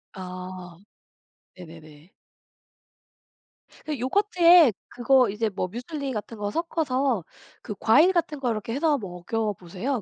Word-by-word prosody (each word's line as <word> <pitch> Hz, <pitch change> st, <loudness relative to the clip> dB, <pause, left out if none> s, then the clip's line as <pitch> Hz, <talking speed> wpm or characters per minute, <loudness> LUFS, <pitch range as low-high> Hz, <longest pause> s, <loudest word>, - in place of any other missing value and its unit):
아 185 Hz, -1 st, -8 dB, 0.8 s
네네네. 160 Hz, -2 st, -14 dB, 1.7 s
그 300 Hz, -4 st, -4 dB
요거트에 345 Hz, -, +5 dB, 0.2 s
그거 250 Hz, -2 st, +3 dB
이제 215 Hz, +2 st, -1 dB
뭐 190 Hz, -2 st, -3 dB
뮤즐리 265 Hz, -, -5 dB
같은 220 Hz, +1 st, -6 dB
거 205 Hz, 0 st, -3 dB
섞어서 275 Hz, -, -1 dB, 0.4 s
그 210 Hz, -, -7 dB
과일 300 Hz, +12 st, +5 dB
같은 330 Hz, -4 st, -1 dB
거 255 Hz, -3 st, -1 dB
이렇게 225 Hz, 0 st, -3 dB
해서 295 Hz, +1 st, +1 dB
먹여보세요. 205 Hz, +3 st, -4 dB
230 Hz, 235 characters per minute, -25 LUFS, 185-285 Hz, 1.7 s, 요거트에